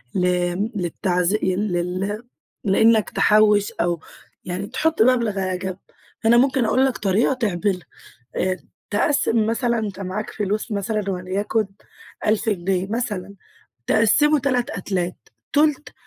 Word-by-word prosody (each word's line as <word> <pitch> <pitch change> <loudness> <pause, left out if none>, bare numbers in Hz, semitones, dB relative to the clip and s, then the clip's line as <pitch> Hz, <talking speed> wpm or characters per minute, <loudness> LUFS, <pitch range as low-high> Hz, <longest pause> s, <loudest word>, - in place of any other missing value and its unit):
ل 180 - +2
آمم، 180 +4 0
للتعز 180 0 0
لل 185 +2 -1 0.4
لأنك 220 +2 +4
تحوش 210 -1 +4
أو 170 0 -1 0.5
يعني 185 +2 -4
تحط 310 +6 0
مبلغ 230 -4 +3
على 185 -1 -1
جنب، 185 0 -5 0.5
فأنا 230 +1 +5
ممكن 260 -1 +3
أقول 260 +4 +3
لك 260 -2 0
طريقة 205 +6 +2
تعملها. 205 -6 -1 0.6
آآ، 185 0 0 0.3
تقسم 225 0 +2
مثلًا 235 +1 0
أنت 205 -3 -4
معاك 195 +3 -4
فلوس 210 +2 -2
مثلًا 205 0 -1
وليكن 195 +4 -1 0.6
1000 215 +1 +1
جنيه 190 -1 -1
مثلًا، 205 -4 -3 0.5
تقسمه 295 +7 +4
3 250 -3 0
أتلات، 180 -1 -4 0.2
تُلت 300 0 +2
205 Hz, 125 wpm, -22 LUFS, 185-230 Hz, 0.6 s, فأنا